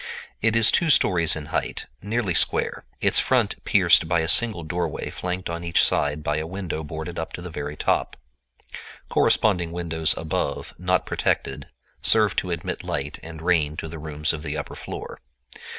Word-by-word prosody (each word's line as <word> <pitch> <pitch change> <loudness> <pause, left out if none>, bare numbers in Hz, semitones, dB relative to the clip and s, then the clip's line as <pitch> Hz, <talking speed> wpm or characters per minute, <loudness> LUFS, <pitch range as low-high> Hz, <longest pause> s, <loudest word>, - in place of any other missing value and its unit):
It 115 +1 +2
is 115 -1 +5
two 170 - +2
stories 85 - +4
in 75 -2 -6
height, - - -2 0.2
nearly 105 -2 -1
square, - - +2 0.2
its - - +3
front - - +1
pierced 90 -3 +4
by 85 0 +2
a 80 - -2
single 110 -2 +6
doorway 85 +3 -3
flanked 90 0 -4
on 85 0 -5
each 85 0 +2
side 75 +1 0
by 75 +1 0
a 80 +1 -3
window 90 -3 -5
boarded 80 +3 -6
up 80 - -5
to - - -6
the 90 - -7
very 75 -1 -5
top. - - 0 0.9
Corresponding 90 -6 +2
windows 80 -2 +1
above, 80 -1 -3
not 90 0 +1
protected, - - -2 0.3
serve 110 -3 +3
to 90 - -1
admit 85 -2 -4
light 75 +2 -4
and 80 -1 -10
rain 80 -4 +1
to - - -4
the 80 0 -8
rooms 75 0 -1
of 80 - -5
the 75 0 -4
upper 75 - -6
floor. - - -8
85 Hz, 175 wpm, -24 LUFS, 80-90 Hz, 0.9 s, single